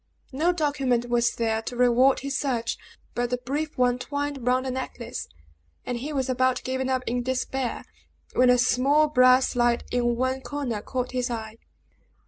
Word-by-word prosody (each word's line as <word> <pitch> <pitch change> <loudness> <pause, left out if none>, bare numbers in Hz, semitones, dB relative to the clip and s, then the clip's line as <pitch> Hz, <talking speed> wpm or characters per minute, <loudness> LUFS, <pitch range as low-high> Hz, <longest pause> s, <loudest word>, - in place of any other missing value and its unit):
No 310 +7 +2
document 275 -7 0
was 235 -1 +2
there 225 -1 0
to 245 - -6
reward 250 +2 +4
his 275 0 -3
search, 245 -5 -1 0.4
but 245 0 -1
the 250 - 0
brief 285 +5 -4
one 250 0 +2
twined 285 -2 -4
round 255 +1 +2
the 260 - -2
necklace; 250 -2 -5 0.6
and 245 -1 -3
he 285 +5 -5
was 270 -3 -1
about 255 0 +1
giving 260 0 -2
up 260 -1 0
in 245 +1 -1
despair, 260 0 -2 0.5
when 250 0 +4
a 250 - +6
small 270 +5 +3
brass 255 -2 +5
slide 240 -1 +1
in 240 -1 +1
one 260 +2 -1
corner 265 -7 -3
caught 250 +2 -3
his 250 -1 -1
eye. 220 -2 -5
255 Hz, 170 wpm, -25 LUFS, 240-265 Hz, 0.6 s, a